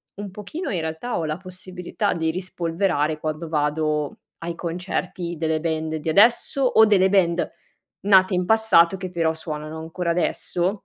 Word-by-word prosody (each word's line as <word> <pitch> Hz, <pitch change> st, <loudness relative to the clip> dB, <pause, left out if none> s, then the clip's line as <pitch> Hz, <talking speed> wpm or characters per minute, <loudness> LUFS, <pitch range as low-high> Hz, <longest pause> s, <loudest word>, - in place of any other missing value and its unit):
un 200 Hz, -1 st, -7 dB
pochino 210 Hz, -, -6 dB
in 180 Hz, -, -1 dB
realtà 160 Hz, +10 st, -3 dB
ho 165 Hz, -, -1 dB
la 155 Hz, +1 st, -2 dB
possibilità 185 Hz, +2 st, -4 dB
di 160 Hz, -2 st, 0 dB
rispolverare 170 Hz, -3 st, -1 dB
quando 155 Hz, +2 st, -4 dB
vado 150 Hz, -1 st, 0 dB, 0.2 s
ai 170 Hz, 0 st, -5 dB
concerti 175 Hz, 0 st, -4 dB
delle 160 Hz, 0 st, 0 dB
band 160 Hz, -1 st, -2 dB
di 155 Hz, +1 st, -3 dB
adesso, 230 Hz, -, +4 dB
o 220 Hz, -3 st, +6 dB
delle 190 Hz, -3 st, +4 dB
band 175 Hz, -3 st, +2 dB, 0.6 s
nate 190 Hz, -1 st, +5 dB
in 180 Hz, 0 st, 0 dB
passato 210 Hz, -5 st, +4 dB
che 185 Hz, -1 st, -5 dB
però 165 Hz, -2 st, +1 dB
suonano 155 Hz, 0 st, -6 dB
ancora 170 Hz, +2 st, -3 dB
adesso. 175 Hz, +1 st, 0 dB
170 Hz, 155 wpm, -23 LUFS, 160-190 Hz, 0.6 s, o